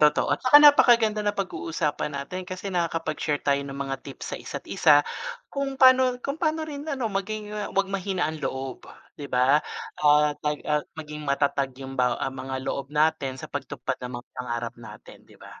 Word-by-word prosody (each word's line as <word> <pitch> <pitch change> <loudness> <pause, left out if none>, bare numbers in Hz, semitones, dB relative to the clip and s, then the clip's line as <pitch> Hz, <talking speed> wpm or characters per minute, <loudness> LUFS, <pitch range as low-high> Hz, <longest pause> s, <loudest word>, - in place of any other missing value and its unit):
Totoo 150 0 +4
at - - -1
'tsaka 255 +2 +7
napakaganda 235 -7 +6
napag-uusapan 165 -8 -2
natin 180 +6 -6
kasi 185 +1 -5
nakakapag-share 165 -3 -1
tayo 140 0 +2
ng 140 -1 -7
mga 135 -1 -3
tips 135 - -8
sa - - -2
isa't-isa, 145 -1 +3 0.5
kung 275 -1 -2
pano 260 -1 +6
kung 280 +3 -3
pano 315 -1 0
rin 295 0 -7
ano, 255 -8 -2
maging 210 +2 -3 0.2
'wag 195 - +4
mahina 190 -1 -1
ang 155 0 -3
loob, 135 -2 -5 0.3
'di 140 - -6
ba, 130 +4 +4 0.4
ah, 150 0 +5
tag 150 0 -2
ah, 150 0 +1 0.2
maging 150 -1 -7
matatag 140 -2 0
yung 135 -1 -4
ba 125 -1 +2
ah, 135 - -3
mga 130 0 -5
loob 140 0 -3
natin 150 -3 +1
sa - - -8
pagtupad 140 -2 -4
ng 125 0 -6
mga 120 - -10
pangarap 120 -2 -4
natin, 105 -2 -12
'di - - -18
ba? - - -14
150 Hz, 175 wpm, -25 LUFS, 135-205 Hz, 0.5 s, tsaka